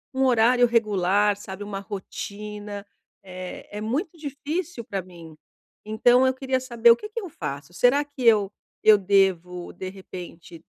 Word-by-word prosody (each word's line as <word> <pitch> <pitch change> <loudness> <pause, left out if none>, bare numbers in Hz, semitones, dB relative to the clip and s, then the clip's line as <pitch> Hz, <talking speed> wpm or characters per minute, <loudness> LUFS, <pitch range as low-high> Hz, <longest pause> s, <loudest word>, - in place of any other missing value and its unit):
um 265 - +2
horário 245 0 +5
regular, 205 -3 +2
sabe, 200 0 -8
uma 200 -1 -5
rotina, 205 +1 -7 0.4
eh, 185 -1 -8
é - - -4
muito 300 - -2
difícil 295 0 -4
pra 195 -3 -4
mim. 170 -3 -13 0.5
Então 245 +4 +4
eu 260 - +2
queria 260 0 -1
saber 235 -2 +4
o - - +7
que 425 - -9
que 455 - -4
eu 375 - -7
faço? 145 - -6
Será 250 - +4
que 285 -3 -9
eu 210 -4 +5 0.3
eu 215 -1 +8
devo, 185 -3 +1
de 185 - -6
repente, 175 -3 -10
210 Hz, 155 wpm, -25 LUFS, 190-255 Hz, 0.5 s, eu